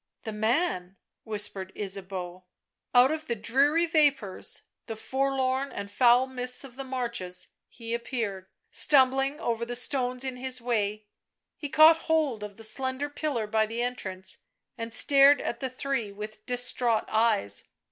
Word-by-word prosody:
" - - -53
The 220 - -5
man," 215 - 0 0.3
whispered 205 -3 -3
Ysabeau. 185 -2 -5 0.5
Out 250 +3 +7
of 315 0 -4
the 235 - -1
dreary 280 +9 +2
vapours, 290 - 0 0.2
the 225 - -5
forlorn 265 +2 -1
and 200 0 -7
foul 245 +3 +5
mists 250 -1 0
of 260 -3 -11
the 270 - -6
marshes, 235 -9 -4 0.2
he 230 -1 -8
appeared, 225 -6 -3 0.2
stumbling 270 +1 +4
over 235 -6 -2
the 240 +1 -4
stones 250 0 +1
in 260 -1 -4
his 255 0 0
way.... 215 -3 -1 0.5
He 290 - -6
caught 315 +3 +7
hold 305 -9 +1
of 205 -1 -8
the 225 - -8
slender 260 +5 -1
pillar 290 -7 -2
by 220 +1 +1
the 230 +2 -3
entrance 190 -7 -3 0.4
and 230 -1 -6
stared 275 +3 +6
at 235 - -4
the 260 - -3
three 255 -4 -3
with 215 +1 -9
distraught 245 -2 +1
eyes. 215 - +1
245 Hz, 150 wpm, -27 LUFS, 215-270 Hz, 0.5 s, Out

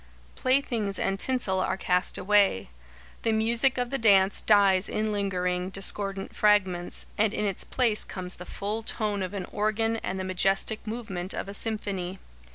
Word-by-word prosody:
Playthings 240 -6 0
and 195 0 -1
tinsel 240 -8 0
are 185 - -1
cast 180 -1 0
away. 200 - +2 0.5
The 225 - +1
music 230 +4 +2
of 245 0 -2
the 275 - -1
dance 200 -3 +4
dies 200 -2 +4
in 215 0 -1
lingering, 180 -3 -1
discordant 195 0 0
fragments, 190 -4 +1
and 215 -1 +3
in 210 - -1
its 195 -3 -2
place 235 -5 +3
comes 185 -1 -7
the 180 - -9
full 210 +3 -3
tone 210 -2 -2
of 185 +2 -4
an 190 - -4
organ 220 +2 0
and 190 -3 -4
the - - -3
majestic 195 +4 0
movement 210 -5 -4
of - - -4
a 200 - -7
symphony. 200 -4 -3
200 Hz, 165 wpm, -27 LUFS, 190-220 Hz, 0.5 s, dance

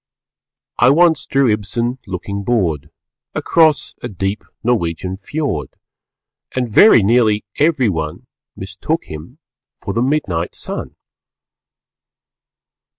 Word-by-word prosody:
I 120 - +6
once 160 +1 +4
drew 135 -1 +2
Ibsen, 115 +4 -2
looking 100 +2 -4
bored 85 - 0 0.5
Across 160 -3 +2
a - - -4
deep 95 +1 -3 0.2
Norwegian 95 -6 -1
Fjord, 105 - -3 0.9
And 125 -1 0
very 120 - +7
nearly 110 -1 +3
everyone 110 - 0 0.3
_Mistook 95 - -3
him 80 +2 -10 0.4
for - - -4
the 115 - 0
Midnight 120 - -1
Sun. - - -6
110 Hz, 95 wpm, -18 LUFS, 95-135 Hz, 0.9 s, very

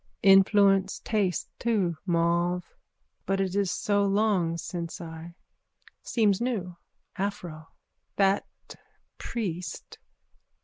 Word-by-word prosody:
_ - - -51 0.2
Influence 195 0 +5
taste 200 -6 0
too, 205 -8 +1
mauve. 170 +1 +1 0.6
But 195 +1 +1
it 190 -1 -1
is 200 -2 +1
so 205 +2 +1
long 195 -4 +1
since 170 0 -5
I. 165 0 -9 0.7
Seems 210 -3 +1
new. 205 -8 -2 0.4
Aphro. 175 -6 -4 0.5
That 195 0 +2 0.7
priest. 180 -6 -5
195 Hz, 95 wpm, -27 LUFS, 170-205 Hz, 0.7 s, Influence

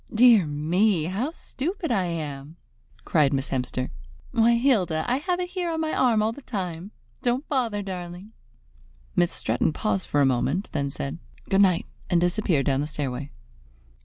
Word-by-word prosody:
"Dear 225 -6 +6
me, 165 +5 +2
how 195 - -1
stupid 330 +1 -4
I 195 -5 +2
am!" 150 -3 -5 0.5
cried 150 -4 +3
Miss 135 0 -1
Hemster, 130 0 -2 0.4
"Why, 235 -1 +4
Hilda, 200 - +2
I 250 +1 +2
have 355 +5 -1
it 360 0 -3
here 360 -2 -2
on 325 -1 -2
my 315 -1 -1
arm 230 -4 +3
all 220 - +1
the 285 - -10
time! 185 -7 -4 0.3
Don't 250 +4 0
bother, 230 -7 0
darling!" 180 +1 -7 0.8
Miss - - +3
Stretton - - 0
paused 100 -2 -1
for 145 - +1
a 140 - +5
moment, 135 - 0
then 140 -2 -1
said, 70 - -5 0.3
"Good 195 +1 +5
night!" 185 -4 +3 0.2
and 175 - +3
disappeared 175 -4 +1
down 135 0 +2
the 150 - -2
stairway. 140 -2 -4
185 Hz, 165 wpm, -25 LUFS, 150-240 Hz, 0.8 s, Dear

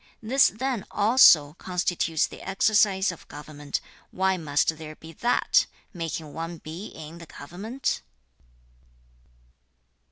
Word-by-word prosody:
This 265 +5 +5
then 245 -2 -2
also 205 - +6
constitutes 175 -3 0
the - - -10
exercise 195 -1 +2
of 170 - -13
government. 145 -1 -6 0.3
Why 190 0 +1
must 155 -1 0
there 155 -1 -8
be 160 +1 -12
THAT 240 +9 +2 0.3
making 165 -3 -5
one 165 +1 -5
be 165 +6 -8
in 160 +2 -10
the 165 - -11
government?' 205 - -4
175 Hz, 115 wpm, -26 LUFS, 155-205 Hz, 0.3 s, also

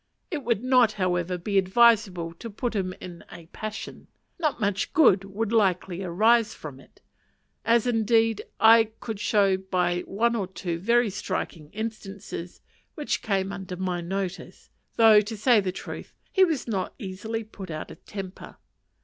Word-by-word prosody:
It 300 -5 -3
would 235 -2 0
not, 250 -4 +4
however, 180 -2 -1
be 195 +3 +1
advisable 190 -4 +3
to 230 - -7
put 230 +2 -3
him 185 -2 -1
in 175 -2 -9
a 170 -2 -11
passion; 215 0 -7 0.3
not 305 -5 0
much 200 -2 -1
good 205 - +5
would 200 +3 -3
be 230 - 0
likely 185 -4 +1
to 195 - -4
arise 220 +5 +3
from 140 -4 -9
it: - - -21 0.6
as, 230 +1 +3
indeed, 225 -1 +2 0.2
I 225 +1 +7
could 220 -3 -5
show 200 -2 +3
by 180 -2 0
one 235 +4 +1
or 200 -5 -2
two 175 -2 -4
very 235 +3 +2
striking 185 -6 -4
instances 200 -4 -7 0.3
which 300 -2 -2
came 195 -3 -1
under 190 -2 -6
my 180 -1 -2
notice; 190 +1 -5 0.2
though, 220 -2 +7
to 215 +1 -6
say 230 +1 +4
the 190 -2 -1
truth, 185 - -8 0.2
he 380 - +5
was 320 -9 0
not 195 -5 -2
easily 220 +2 -5
put 200 -3 -10
out 155 -1 -6
of - - -14
temper. 195 -2 -8
200 Hz, 165 wpm, -26 LUFS, 185-225 Hz, 0.6 s, I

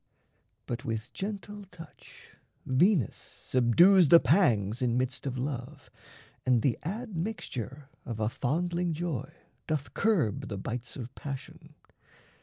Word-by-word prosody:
But 120 0 -4
with 115 +2 -4
gentle 205 0 -5
touch 170 -4 -15 0.3
Venus 145 - +3
subdues 170 - +4
the 170 +3 +9
pangs 120 - +3
in 120 -1 +1
midst 130 +2 -1
of 130 -1 -3
love, 130 +1 -5 0.5
And 125 -3 +3
the 125 -5 +1
admixture 170 - -4 0.2
of 115 -2 -5
a 110 - +1
fondling 170 +8 -1
joy 160 -6 -3 0.4
Doth 150 -3 -2
curb 175 - +1
the 100 - -4
bites 120 +4 -5
of 125 -2 -7
passion. 150 +3 -8
140 Hz, 120 wpm, -29 LUFS, 120-175 Hz, 0.5 s, the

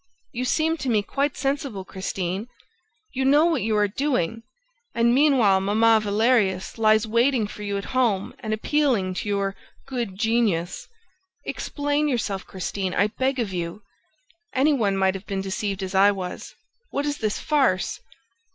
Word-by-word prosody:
You 250 0 -3
seem 320 +5 +1
to 265 - -3
me 215 -3 +2
quite 280 +7 -1
sensible, 270 -8 -2
Christine. 190 +2 -4 0.7
You 265 - -1
know 290 +4 +5
what 325 -7 +1
you 215 0 0
are 205 0 +3
doing... 225 - -1 0.5
And 235 +1 +3
meanwhile 250 -9 +4
Mamma 220 +3 +4
Valerius 210 -2 +1
lies 220 0 +4
waiting 235 +1 +2
for 210 - -9
you 200 -1 -2
at 200 - -5
home 230 -7 +1
and 220 - -5
appealing 220 -4 +1
to 205 - -4
your 200 -1 -1 0.3
'good 235 -8 -4
genius!'... 215 -6 0 0.6
Explain 290 +1 -1
yourself, 220 -8 -2
Christine, 190 0 -3
I 200 +3 +3
beg 260 +4 -1
of 220 -6 -2
you! 175 +3 -4 0.7
Any 285 +4 +4
one 205 -7 +1
might 190 0 +2
have 195 +1 -8
been 195 -1 -2
deceived 195 0 -3
as 185 0 -5
I 195 +1 +6
was. 185 -3 -5 0.3
What 280 - -2
is 290 0 -2
this 215 -2 -1
farce?" 270 -11 +1
215 Hz, 160 wpm, -24 LUFS, 195-260 Hz, 0.7 s, I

